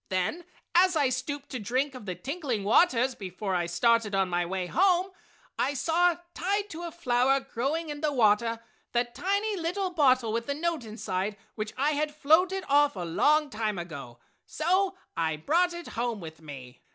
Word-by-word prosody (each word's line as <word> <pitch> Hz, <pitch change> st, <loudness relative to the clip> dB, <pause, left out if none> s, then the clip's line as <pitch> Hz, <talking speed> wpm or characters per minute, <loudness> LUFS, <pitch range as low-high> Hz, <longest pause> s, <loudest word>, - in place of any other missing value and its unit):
"Then 190 Hz, -, -1 dB, 0.3 s
as 360 Hz, +1 st, +5 dB
I 285 Hz, -4 st, +3 dB
stooped 275 Hz, +3 st, -4 dB
to 255 Hz, -, -3 dB
drink 255 Hz, +7 st, -1 dB
of 250 Hz, -5 st, -10 dB
the 180 Hz, -, -3 dB
tinkling 260 Hz, -, -3 dB
waters 255 Hz, -, +4 dB
before 190 Hz, -1 st, -5 dB
I 175 Hz, -1 st, 0 dB
started 210 Hz, +4 st, +2 dB
on 190 Hz, -1 st, +1 dB
my 175 Hz, 0 st, 0 dB
way 185 Hz, 0 st, -2 dB
home, 370 Hz, -, +2 dB, 0.5 s
I 285 Hz, -, +1 dB
saw, 340 Hz, +5 st, +2 dB, 0.2 s
tied 405 Hz, +4 st, -1 dB
to 330 Hz, -, -6 dB
a 340 Hz, -1 st, -5 dB
flower 270 Hz, -4 st, +2 dB
growing 280 Hz, +6 st, -3 dB
in 295 Hz, 0 st, -5 dB
the 305 Hz, -1 st, +1 dB
water, 230 Hz, -2 st, +2 dB, 0.3 s
the 240 Hz, 0 st, +3 dB
tiny 400 Hz, -, -1 dB
little 365 Hz, +3 st, -2 dB
bottle 255 Hz, -8 st, +3 dB
with 235 Hz, +1 st, -2 dB
the 280 Hz, -, -1 dB
note 325 Hz, -4 st, -2 dB
inside 205 Hz, -2 st, -3 dB, 0.2 s
which 215 Hz, 0 st, -4 dB
I 285 Hz, +3 st, +2 dB
had 300 Hz, 0 st, -1 dB
floated 355 Hz, +6 st, +3 dB
off 290 Hz, -1 st, +4 dB
a 185 Hz, -, -5 dB
long 295 Hz, -, +2 dB
time 215 Hz, -2 st, -2 dB
ago, 145 Hz, -9 st, -7 dB, 0.3 s
so 370 Hz, +4 st, +1 dB, 0.2 s
I 160 Hz, -1 st, 0 dB
brought 335 Hz, -, +2 dB
it 345 Hz, 0 st, -7 dB
home 235 Hz, -2 st, -2 dB
with 160 Hz, -2 st, -10 dB
me!" 135 Hz, -5 st, -10 dB
260 Hz, 180 wpm, -28 LUFS, 205-330 Hz, 0.5 s, as